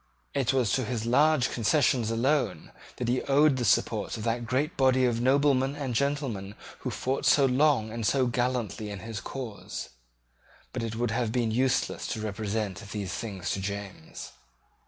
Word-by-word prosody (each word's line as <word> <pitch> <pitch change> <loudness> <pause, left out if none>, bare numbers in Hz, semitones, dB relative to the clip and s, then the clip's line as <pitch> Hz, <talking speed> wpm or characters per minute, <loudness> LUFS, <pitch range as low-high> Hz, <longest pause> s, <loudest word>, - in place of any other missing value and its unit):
It 135 -3 +1
was 125 -6 +1
to 130 - +1
his 115 -1 -3
large 140 +2 +3
concessions 120 -1 +2
alone 115 - 0 0.2
that 125 - -3
he 125 +1 +1
owed 140 0 +4
the 125 - -1
support 115 - +1
of 110 - -6
that 115 +1 -1
great 140 +7 0
body 130 -1 +3
of 120 -1 0
noblemen 135 +1 +3
and 140 -4 -3
gentlemen 120 -7 -1 0.2
who - - -4
fought 130 +1 -2
so 140 - +5
long 130 -4 +2
and 115 0 -4
so 130 +4 +2
gallantly 120 -3 -1
in 100 -2 -6
his 110 -1 -6
cause. 125 -6 -6 0.8
But 125 - -3
it 115 -1 -3
would 120 0 -1
have 115 -1 0
been 120 -2 0
useless 130 +3 0
to - - -5
represent 105 -2 -3
these 105 -3 -4
things 100 -6 -4
to 95 - -2
James. 100 -4 -6
120 Hz, 170 wpm, -28 LUFS, 110-135 Hz, 0.8 s, so